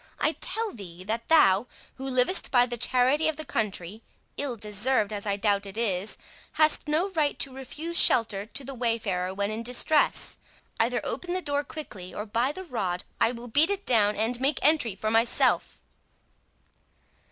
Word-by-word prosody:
I - - +2
tell 445 -1 -1
thee, 185 -4 -9
that 225 +4 -3
thou, 215 -9 +4 0.3
who 265 +1 -6
livest 255 +8 +2
by 245 -2 +4
the 245 -1 -4
charity 255 +5 +2
of 315 - 0
the 310 +1 -6
country—ill 215 +6 -4
deserved, 215 +1 0
as 205 0 -4
I 200 0 0
doubt 205 -1 0
it 195 +2 -9
is—hast 230 - -1
no 320 +6 +1
right 305 -5 0
to 270 - -1
refuse 295 +6 -3
shelter 210 -3 +4
to 275 - -4
the 275 +1 -7
wayfarer 225 -7 -1
when 200 +2 -2
in 220 +1 -4
distress. 250 +6 +1 0.4
Either - - +1
open 355 -1 -4
the 370 - 0
door 285 -1 0
quickly, 215 - -9
or, 210 - -4
by 235 +5 0
the 375 +5 -8
rood, 190 - -3 0.2
I 230 - +3
will 240 0 -9
beat 295 - +4
it 400 0 -2
down 210 -4 +4
and 235 +3 -2
make 275 +1 +1
entry 290 -9 +3
for 215 +2 -2
myself." 225 +1 +1
235 Hz, 170 wpm, -27 LUFS, 205-290 Hz, 0.4 s, thou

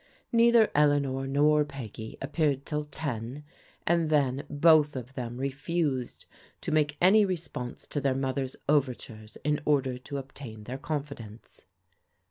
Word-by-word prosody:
Neither 235 -1 +5
Eleanor 140 -2 +2
nor 150 +2 +4
Peggy 115 -6 -8
appeared 145 -1 0
till 150 -1 -2
ten, 140 -2 -5 0.4
and 170 -2 +2
then 140 -3 +1
both 150 0 +5
of 130 0 -6
them 120 -2 -5
refused 140 0 -2 0.4
to - - -3
make 150 -1 +1
any 200 +4 +6
response 170 -10 -4
to 145 - -3
their 135 -1 +1
mother's 135 0 -2
overtures 125 -6 -1
in 150 0 +1
order 135 -4 +1
to 140 +3 -6
obtain 130 -5 -8
their 125 +5 -6
confidence. 140 -8 -6
140 Hz, 130 wpm, -28 LUFS, 130-150 Hz, 0.4 s, any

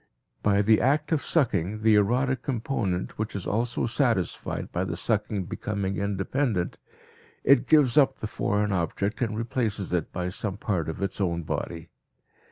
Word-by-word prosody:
By 100 0 +3
the 110 +1 +4
act 145 +5 +1
of 155 -3 +2
sucking, 110 - +1
the 110 -1 +5
erotic 125 +5 +2
component 115 -9 -2
which 110 -1 -3
is 100 - -4
also 120 +3 0
satisfied 115 - 0
by - - -1
the - - -3
sucking 100 -4 0
becoming 100 0 -3
independent, 100 +1 -1 0.6
it 130 -2 +5
gives 150 -4 +5
up 140 - +3
the - - -5
foreign 105 -1 0
object 95 +5 -1
and 110 -3 -1
replaces 115 -5 -2
it 90 - -1
by 90 0 -3
some 95 +1 -4
part 95 -7 -1
of 80 - -4
its 100 +1 -2
own 85 -3 0
body. 80 +1 -4
105 Hz, 160 wpm, -26 LUFS, 95-120 Hz, 0.6 s, the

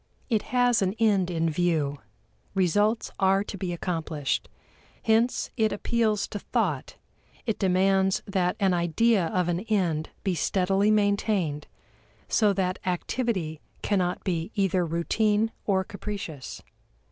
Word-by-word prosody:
It 220 -2 +3
has 245 -2 +3
an 190 +1 0
end 200 -5 +3
in 165 -1 0
view; 155 -4 0 0.6
results 205 +5 +2
are 195 0 +3
to 205 - -7
be 185 -2 -3
accomplished. 165 -5 -2 0.5
Hence 225 +2 +2
it 220 -2 +2
appeals 215 -1 0
to 205 - -4
thought; - - -1 0.5
it 225 -4 -1
demands 190 0 +2
that 185 -3 0
an 195 -3 +3
idea 175 +3 +2
of 180 +1 0
an 175 0 0
end 180 -7 0
be 190 - +1
steadily 195 +3 +1
maintained, 200 -7 +1 0.6
so 210 -3 +3
that 185 -2 -1
activity 180 -3 -2 0.2
cannot 185 -3 0
be 170 -1 -1
either 190 -3 +2
routine 210 +6 +1 0.2
or 190 -2 +2
capricious. 190 -8 -7
190 Hz, 125 wpm, -26 LUFS, 175-210 Hz, 0.6 s, It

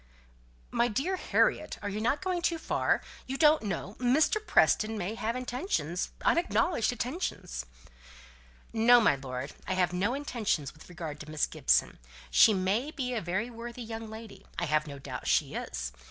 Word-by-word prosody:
"My 235 - +2
dear 275 - -1
Harriet, - - +1
are 205 - -2
not 215 +5 +1
you - - -11
going 365 -2 -1
too 340 -1 +1
far? 315 - 0 0.2
You 265 +1 -3
don't 305 0 +5
know 195 0 -4
Mr. 285 +12 +3
Preston 220 - +3
may 195 +1 -2
have 230 +1 -2
intentions 245 - -2 0.2
unacknowledged 335 -7 +2
intentions." 240 - -4 1.1
"No, 235 +2 +6
my 220 -10 +4
lord. 130 0 -6
I 185 - 0
have 180 -1 +1
no 200 +8 0
intentions 220 - -2
with 160 - -16
regard 160 -4 -6
to 150 - -9
Miss 155 -1 +1
Gibson. - - +1 0.3
She 225 - +7
may 200 +7 0
be 260 -5 -3
a 230 - -1
very 190 +7 -2
worthy 235 +1 -7
young 225 0 -6
lady 220 0 -10
I 175 - 0
have 155 -1 +1
no 140 -1 -7
doubt 135 - -7
she - - +2
is. - - -4
220 Hz, 170 wpm, -30 LUFS, 175-250 Hz, 1.1 s, She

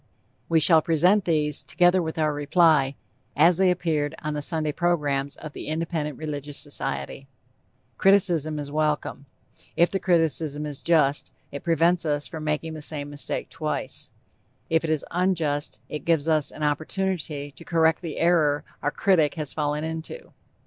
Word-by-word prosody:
We 165 - +4
shall 160 +1 +5
present 180 +6 +3
these 150 -3 +2
together 180 +1 +3
with 160 -1 -4
our 155 -1 +1
reply 145 -2 +3 0.4
as 170 0 +5
they 190 -1 +4
appeared 160 -5 -1
on 150 0 -2
the 150 - -3
Sunday 155 0 0
Programs 145 -5 0
of 155 -2 -9
the - - -8
Independent 155 -2 -3
Religious 145 -2 -4
Society. 135 - -3 0.7
Criticism 175 -6 +3
is 145 -1 -5
welcome. 150 -2 -1 0.5
If 170 - +3
the 195 - -1
criticism 160 -4 +1
is 145 -2 -6
just, 150 -4 +2 0.2
it 140 - -7
prevents 170 +1 +2
us 145 -2 -1
from 160 -1 -7
making 155 +1 -2
the 155 - -7
same 145 -1 -3
mistake 145 0 -5
twice; 155 -2 -3 0.6
if 160 0 +3
it 165 - -2
is 155 -3 0
unjust, 160 - 0
it 150 - -6
gives 165 -3 +1
us 155 -2 +2
an 155 - -6
opportunity 155 -1 -2
to 160 - -13
correct 165 -1 +2
the 165 -4 -6
error 155 -4 +2 0.2
our 145 - +1
critic 160 -2 +2
has 150 -3 -5
fallen 150 -1 -1
into. 160 - -6
155 Hz, 160 wpm, -25 LUFS, 145-170 Hz, 0.7 s, shall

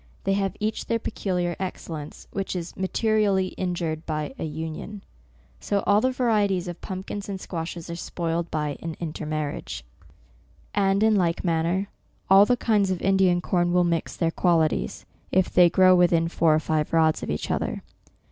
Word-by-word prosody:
They 195 - +1
have 195 -1 -1
each 215 +1 -2
their 230 - +1
pecu 205 -4 -3
liar 175 -1 0
excellence, 165 -5 -6
which 195 -1 -3
is 175 -1 -5
materially 200 -1 +1
injured 170 -4 -3
by 155 - -3
an 160 - -3
union. 160 +6 -6 0.6
So 200 -1 -1
all 205 +1 +4
the 255 - +2
varieties 210 -8 +1
of 175 -1 -7
pumpkins 195 +2 -6
and 195 -1 -4
squashes 170 -1 -5
are 170 - -5
spoiled 170 0 -3
by 150 -2 -2
an 165 -1 -5
intermar 155 -2 -3
riage. - - -7 0.9
And 195 0 +2
in 220 -1 +4
like 170 -4 +1
manner, 170 +3 +1 0.4
all 195 +2 +8
the 245 - +3
kinds 210 -5 +2
of 185 -2 -1
Indian 190 -2 +3
corn 175 -1 +1
will 180 0 +4
mix 170 -2 -1
their 165 -2 0
qualities, 160 - +1 0.3
if 185 0 +2
they 180 -1 +7
grow 185 +2 +6
within 170 -2 +4
four 165 -2 +3
or - - +3
five 155 -1 -1
rods 160 -1 +3
of - - -5
each 75 - -2
other. - - -2
180 Hz, 175 wpm, -25 LUFS, 165-195 Hz, 0.9 s, all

